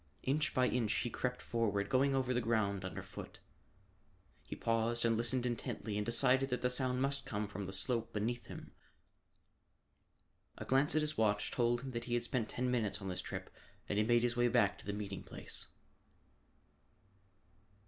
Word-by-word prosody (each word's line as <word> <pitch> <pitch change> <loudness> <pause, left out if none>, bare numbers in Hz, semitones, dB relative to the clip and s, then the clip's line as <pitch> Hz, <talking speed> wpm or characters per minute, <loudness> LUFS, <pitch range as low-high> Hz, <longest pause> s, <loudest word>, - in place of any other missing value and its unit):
Inch 150 +4 +1
by 125 -1 +4
inch 120 -4 +1
he 120 - -1
crept 125 0 -2
forward, 105 -4 0
going 135 +3 +3
over 130 -1 +1
the 125 - +1
ground 105 -4 0
under 95 - -5
foot. - - -9 1.0
He - - -7
paused 115 +1 +1
and 115 -1 +3
listened 120 +2 +1
intently 115 -3 -3
and 105 - 0
decided 130 +4 +3
that 125 -1 -2
the 125 - +2
sound 125 0 +1
must 140 0 0
come 105 0 -3
from 100 -1 -5
the - - -5
slope 115 +4 -1
beneath 115 +2 -2
him. - - -9 1.9
A - - -6
glance 135 +3 +3
at 155 - +4
his 150 -2 -1
watch 105 -2 +2
told 120 0 +1
him 135 0 -6
that 120 -1 -4
he 120 - 0
had 120 - +1
spent 120 -2 -1
ten 125 0 -1
minutes 110 -5 0
on 95 -2 -5
this 90 0 0
trip - - -6 0.4
and 105 - 0
he - - +4
made 120 +1 +3
his 120 0 +1
way 120 0 +3
back 105 -5 +3
to - - -13
the - - 0
meeting 100 -2 -4
place. - - -2
120 Hz, 185 wpm, -35 LUFS, 105-125 Hz, 1.9 s, by